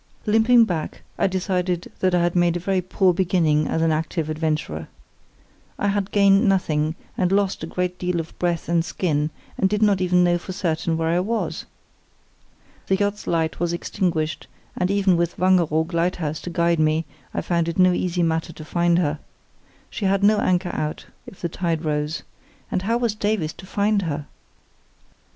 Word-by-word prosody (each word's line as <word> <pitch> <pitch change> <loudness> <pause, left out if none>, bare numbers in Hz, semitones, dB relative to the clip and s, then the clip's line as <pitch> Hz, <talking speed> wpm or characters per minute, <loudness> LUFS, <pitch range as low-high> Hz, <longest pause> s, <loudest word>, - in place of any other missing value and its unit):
Limping 225 +2 +5
back, 170 -6 -4 0.2
I - - +3
decided 180 -2 -1
that 185 -1 +2
I 175 - +3
had 175 0 0
made 175 -1 +3
a - - -4
very 185 +1 0
poor 185 +1 +2
beginning 165 -4 +2
as 160 - 0
an 165 - +3
active 155 0 -2
adventurer. 155 0 -2 0.9
I 205 - 0
had 200 -1 -1
gained 200 +1 +4
nothing, 160 -5 +1 0.2
and 180 -1 +1
lost 195 -3 +1
a - - -3
great 180 +1 -3
deal 180 -1 -1
of 165 0 -6
breath 175 -2 -1
and 170 0 +2
skin, 155 -4 -1 0.3
and 190 - +3
did 210 +1 +1
not 200 -3 +3
even 180 0 +3
know 175 0 +2
for 185 - -7
certain 165 -3 -1
where 165 0 0
I 170 +2 +2
was. 220 +5 -2 1.2
The 190 - +3
yacht's 205 +1 -2
light 160 -1 0
was 170 0 0
extinguished, 170 -3 -2 0.3
and, 180 - 0
even 195 -3 +3
with 170 0 -1
Wangeroog 170 -3 +2
Lighthouse 165 -2 -1
to - - -6
guide 170 -1 +1
me, 155 +1 +2 0.3
I - - -2
found 170 -2 0
it 165 - -4
no 185 -1 +5
easy 175 -1 0
matter 165 +1 0
to 155 - -10
find 170 +1 +2
her. 155 -4 0 0.7
She 210 - -3
had 195 +1 +2
no 210 +1 +5
anchor 180 -2 +1
out, 150 0 -3 0.2
if 190 - -12
the 170 - 0
tide 165 -2 -2
rose. 150 +1 -2 0.5
And 185 - 0
how 225 +5 +1
was 235 -3 0
Davies 205 -7 -1
to 190 - -13
find 205 +1 +1
her? 150 -4 -3
175 Hz, 180 wpm, -23 LUFS, 165-190 Hz, 1.2 s, Limping